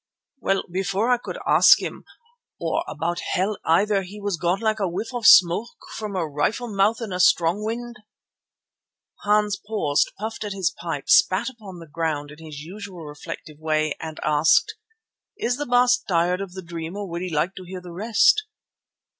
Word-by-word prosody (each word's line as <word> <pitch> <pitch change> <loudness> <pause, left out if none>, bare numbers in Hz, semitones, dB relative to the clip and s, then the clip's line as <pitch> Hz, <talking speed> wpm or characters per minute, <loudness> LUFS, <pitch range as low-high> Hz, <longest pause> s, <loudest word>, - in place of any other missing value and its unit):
"Well, 195 -5 0
before 195 +5 0
I 245 - +3
could - - -7
ask - - +7
him, - - -6 0.5
or - - -1
about 165 +3 -3
hell 195 +3 -1
either, 195 +5 +3
he 195 +3 -9
was 205 -2 -2
gone 175 +3 0
like 220 0 0
a 195 - 0
whiff 210 +8 -5
of 240 -2 +1
smoke 185 +6 +6 0.3
from 210 -2 -5
a 170 -4 -1
rifle 205 +11 -2
mouth 205 +4 +2
in 215 -5 -4
a 180 - -3
strong 180 +2 +3
wind." 235 +1 -4 1.3
Hans 210 -1 +2
paused, 205 -10 0
puffed 220 +2 -5
at 205 -1 -4
his 190 -4 0
pipe, 165 -5 -6
spat 205 +8 +4
upon 205 -7 -12
the 165 - -10
ground 155 -2 -3
in 150 +2 -13
his 150 -2 -8
usual 185 0 -9
reflective 150 +1 -9
way 155 -1 0
and 160 -1 -7
asked: 150 +1 +3 0.6
"Is 245 - -1
the 290 - -4
Baas 245 +1 +4
tired 180 -1 0
of 195 -2 -6
the 190 0 -8
dream 170 +2 -6
or 205 -1 -4
would 170 0 -5
he 185 - -3
like 165 +4 0
to 185 - -7
hear 185 +1 -7
the 180 -1 -11
rest?" 230 - +3
190 Hz, 180 wpm, -23 LUFS, 165-215 Hz, 1.3 s, ask